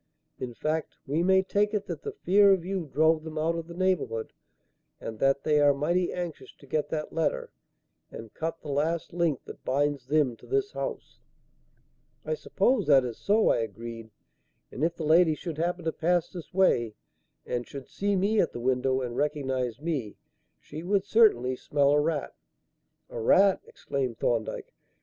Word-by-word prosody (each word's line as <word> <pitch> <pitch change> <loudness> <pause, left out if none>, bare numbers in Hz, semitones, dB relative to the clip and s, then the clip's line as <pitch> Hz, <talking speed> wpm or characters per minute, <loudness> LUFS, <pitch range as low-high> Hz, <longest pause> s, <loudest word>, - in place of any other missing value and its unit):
In 120 -2 -5
fact, 155 +4 -2
we 145 +4 0
may 190 +1 +4
take 205 +2 +1
it 205 -1 -1
that - - -6
the 430 - -5
fear 200 - +4
of 180 -3 -1
you 185 -3 -3
drove 160 +1 +3
them 160 -1 -7
out 160 +2 +1
of 165 -1 -5
the 170 - -9
neighbourhood, 175 -12 -1 0.7
and 110 -1 -7
that 135 0 +2
they 150 -1 +3
are 145 -1 +5
mighty 175 +6 0
anxious 175 -3 -6
to - - -18
get 150 +2 -1
that 155 -1 -4
letter 165 -2 -1 0.6
and 115 -1 -10
cut 165 +1 -4
the 150 - -7
last 160 +5 -1
link 170 -6 0
that - - -11
binds 140 -1 0
them 145 -4 +2
to - - -17
this 410 +1 0
house." - - -6 1.1
"I - - -1
suppose 260 - +1
that 135 -3 +6
is 120 -3 -6
so," 215 +2 +3
I - - +3
agreed; 115 +1 -6 0.6
"and 140 - -4
if 165 +1 +1
the 160 - -5
lady 160 +1 +5
should 160 -1 -6
happen 175 0 -1
to 160 - +1
pass 175 +1 0
this 175 -3 -9
way 120 - +2 0.5
and 120 -1 -3
should 135 -2 -9
see 200 0 -1
me 205 +3 +2
at 165 - -1
the - - -5
window 130 +1 +1
and 120 -2 -4
recognize 135 -5 -1
me, 145 -10 -3 0.4
she 155 +2 -9
would 195 +2 0
certainly 200 - +4
smell 140 +2 +1
a 145 - +4
rat." 150 -2 -2 0.8
"A - - -5
rat!" 190 - +4
exclaimed 130 -4 -4
Thorndyke. 115 -2 -2
155 Hz, 180 wpm, -28 LUFS, 130-180 Hz, 1.1 s, that